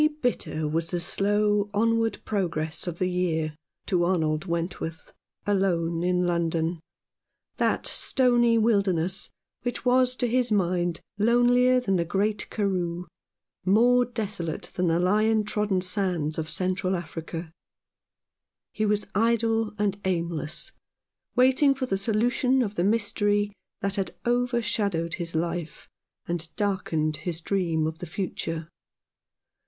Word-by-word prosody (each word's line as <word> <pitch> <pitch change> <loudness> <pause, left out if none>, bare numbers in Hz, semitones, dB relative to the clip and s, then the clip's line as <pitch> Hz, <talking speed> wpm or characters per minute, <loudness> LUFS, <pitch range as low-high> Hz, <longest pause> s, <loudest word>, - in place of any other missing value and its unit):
VERY 305 0 +3
bitter 160 -10 -1
was 165 +2 -1
the 175 - -1
slow 205 +3 +2
onward 225 +1 +2
progress 170 -5 -2
of 170 -1 -3
the 185 - 0
year 165 -4 -1 0.3
to 180 -3 +1
Arnold 160 -3 +1
Wentworth 170 -1 -4 0.3
alone 170 -5 +1
in 180 0 +2
London, 170 -1 0 0.8
that - - +1
stony 240 -3 +3
wilderness 195 -5 +1 0.3
which 245 +1 -4
was 255 0 +3
to 245 - 0
his 245 0 +1
mind 175 -4 +1 0.2
lonelier 245 +3 +4
than 195 -6 0
the 170 - +1
great 205 +5 -1
Karroo, 180 -4 -1 0.6
more 240 +6 +5
desolate 210 -9 -4
than 180 0 0
the 165 0 +3
lion 215 +4 +3
trodden 210 -2 0
sands 180 -5 -1
of 160 0 -3
Central 185 0 0
Africa. 165 -1 -6 1.2
He 215 0 0
was 210 0 +1
idle 225 0 +2
and 205 -1 0
aimless, 170 -4 -2 0.6
waiting 265 +2 +5
for 265 -1 -2
the 220 - -1
solution 245 +5 +2
of 205 -3 -3
the 175 - 0
mystery 205 0 +1 0.3
that 200 0 -1
had 190 -3 -2
overshadowed 230 -8 0
his 165 -1 -2
life, 165 -1 -3 0.4
and 170 -1 -3
darkened 160 -7 0
his 165 +2 -3
dream 170 -3 0
of 160 +1 -3
the 180 - -6
future. 165 -2 -4
190 Hz, 125 wpm, -26 LUFS, 170-220 Hz, 1.2 s, more